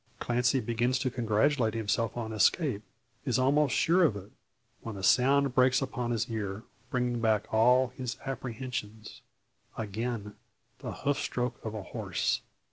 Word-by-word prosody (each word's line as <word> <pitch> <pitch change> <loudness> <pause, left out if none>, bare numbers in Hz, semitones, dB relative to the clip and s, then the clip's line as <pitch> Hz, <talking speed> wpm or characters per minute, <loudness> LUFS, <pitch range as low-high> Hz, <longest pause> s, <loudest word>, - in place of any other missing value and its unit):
Clancy 125 +2 +1
begins 120 +2 0
to 130 0 -1
congratulate 115 0 +1
himself 115 +1 -1
on 110 -2 -4
escape, 110 - +2 0.4
is 125 -5 +1
almost 135 +1 +3
sure 180 +3 +4
of 145 -11 +3
it, 100 +1 -9 0.5
when 110 -3 -6
a 95 - -7
sound 135 +6 +4
breaks 125 0 +4
upon 125 -3 -3
his 115 -1 0
ear, 110 -2 -4 0.3
bringing 125 -2 -1
back 110 -2 +2
all 125 +3 +5
his 125 0 -5
apprehensions. 120 -4 -5 0.6
Again 110 0 -4 0.5
the - - -5
hoof 145 -1 -1
stroke 125 0 -3
of 110 -1 -5
a 105 - -5
horse! - - -1
120 Hz, 145 wpm, -30 LUFS, 110-130 Hz, 0.6 s, all